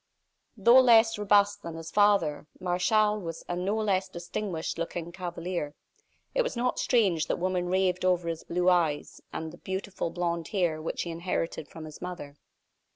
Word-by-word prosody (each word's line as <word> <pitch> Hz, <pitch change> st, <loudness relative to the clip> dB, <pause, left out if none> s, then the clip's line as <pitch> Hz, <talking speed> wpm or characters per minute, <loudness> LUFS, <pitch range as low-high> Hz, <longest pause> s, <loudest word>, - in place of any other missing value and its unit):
Though 235 Hz, +5 st, +7 dB
less 225 Hz, -3 st, +5 dB
robust 205 Hz, 0 st, +3 dB
than 165 Hz, -1 st, -7 dB
his 165 Hz, 0 st, -8 dB
father, 200 Hz, -8 st, +3 dB
Martial 210 Hz, +4 st, +2 dB
was 165 Hz, -4 st, -6 dB
a 175 Hz, -, -2 dB
no 185 Hz, +4 st, -1 dB
less 195 Hz, -3 st, 0 dB
distinguished 175 Hz, -1 st, -4 dB
looking 170 Hz, 0 st, -4 dB
cavalier. 175 Hz, -4 st, -4 dB, 0.6 s
It -, -, +3 dB
was 475 Hz, -, -2 dB
not 250 Hz, +1 st, 0 dB
strange 195 Hz, -10 st, +2 dB
that -, -, 0 dB
women 180 Hz, 0 st, -1 dB
raved 185 Hz, -1 st, +1 dB
over 180 Hz, -2 st, +2 dB
his 165 Hz, -1 st, -3 dB
blue 180 Hz, +1 st, -1 dB
eyes, 165 Hz, -5 st, +1 dB
and 160 Hz, 0 st, -5 dB
the -, -, -13 dB
beautiful 190 Hz, -2 st, -4 dB
blond 170 Hz, -1 st, -2 dB
hair 175 Hz, -6 st, 0 dB
which 160 Hz, -, -3 dB
he 170 Hz, -, -5 dB
inherited 165 Hz, -2 st, -3 dB
from 160 Hz, +1 st, -9 dB
his 155 Hz, -1 st, -11 dB
mother. 175 Hz, -6 st, -7 dB
180 Hz, 165 wpm, -28 LUFS, 165-205 Hz, 0.6 s, Though